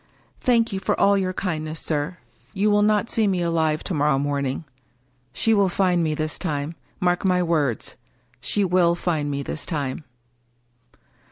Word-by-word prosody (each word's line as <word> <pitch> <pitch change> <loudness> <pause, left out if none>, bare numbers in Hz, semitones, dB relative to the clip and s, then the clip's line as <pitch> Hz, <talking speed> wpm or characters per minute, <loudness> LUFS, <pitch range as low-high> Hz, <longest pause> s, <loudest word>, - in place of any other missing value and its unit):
" - - -35
Thank 230 -3 +3
you 190 - -1
for - - -1
all 200 0 +5
your 190 -2 0
kindness, 155 -4 -3
sir. 155 +3 -2 0.4
You 210 +2 +2
will 205 0 +4
not 210 +1 +2
see 220 -2 +2
me 185 -3 +1
alive 160 -2 0
to 190 - -3
morrow 145 -2 +2
morning. 140 0 -1 0.7
She 175 - +1
will 200 -3 +3
find 180 -1 +2
me 155 -1 0
this 155 0 -3
time. 150 -3 -2 0.3
Mark 180 -1 +1
my 180 -2 +2
words 150 -9 -1 0.2
— - - -38
she 205 -1 +2
will 175 -1 +3
find 160 -4 -1
me 140 0 -2
this 145 - -4
time." 145 -3 -3
170 Hz, 175 wpm, -23 LUFS, 150-190 Hz, 0.7 s, all